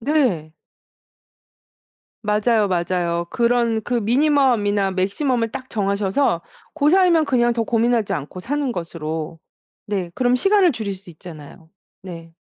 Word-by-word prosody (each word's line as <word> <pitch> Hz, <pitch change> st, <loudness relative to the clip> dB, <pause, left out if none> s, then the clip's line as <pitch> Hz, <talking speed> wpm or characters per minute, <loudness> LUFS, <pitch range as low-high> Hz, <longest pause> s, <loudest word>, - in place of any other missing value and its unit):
네. 225 Hz, -, 0 dB, 1.7 s
맞아요, 210 Hz, 0 st, +2 dB
맞아요. 170 Hz, -1 st, -1 dB
그런 235 Hz, -2 st, +1 dB
그 245 Hz, -, -3 dB
미니멈이나 235 Hz, -5 st, +2 dB
맥시멈을 230 Hz, +5 st, -1 dB
딱 260 Hz, 0 st, -7 dB
정하셔서 200 Hz, -1 st, 0 dB, 0.3 s
고 300 Hz, -1 st, +2 dB
사이면 350 Hz, -3 st, +4 dB
그냥 240 Hz, -3 st, +2 dB
더 230 Hz, -1 st, -1 dB
고민하지 230 Hz, -1 st, +1 dB
않고 150 Hz, +6 st, -5 dB
사는 280 Hz, +4 st, -2 dB
것으로 160 Hz, -3 st, -5 dB, 0.5 s
네 195 Hz, -4 st, -2 dB
그럼 250 Hz, -1 st, +2 dB
시간을 390 Hz, +5 st, +3 dB
줄일 215 Hz, -5 st, -4 dB
수 185 Hz, -1 st, -14 dB
있잖아요. 160 Hz, -1 st, -12 dB, 0.3 s
네. 165 Hz, -3 st, -10 dB
220 Hz, 270 characters per minute, -21 LUFS, 180-255 Hz, 1.7 s, 사이면